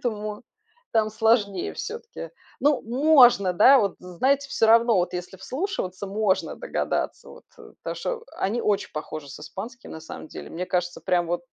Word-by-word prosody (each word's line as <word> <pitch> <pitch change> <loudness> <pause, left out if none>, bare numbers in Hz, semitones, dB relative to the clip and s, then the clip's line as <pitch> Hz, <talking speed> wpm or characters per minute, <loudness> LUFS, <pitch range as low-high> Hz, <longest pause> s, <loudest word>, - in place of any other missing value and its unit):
поэтому 215 -2 -4 0.5
там 220 -1 +3
сложнее 220 -4 +1
всё-таки. 465 +2 -7 0.3
Но 290 -2 +2
можно, 245 -6 +5
да? 255 +9 +7
Вот, 200 -5 +1
знаете, 265 +11 0
всё 225 - +2
равно, 230 -1 +5
вот 180 0 0
если 180 +2 -6
вслушиваться, 200 - -4
можно 200 -2 0
догадаться - - -3
вот, - - -14
потому - - -8
что 470 -2 -4
они 220 +5 0
очень 205 -2 0
похожи 155 -1 -6
с - - -9
испанским, 230 +11 -8
на 160 - -8
самом 160 - -9
деле. - - -9
Мне 180 +2 -4
кажется, 180 -1 -2
прям 175 -2 +1
вот 175 +6 -1
215 Hz, 160 wpm, -25 LUFS, 180-255 Hz, 0.5 s, да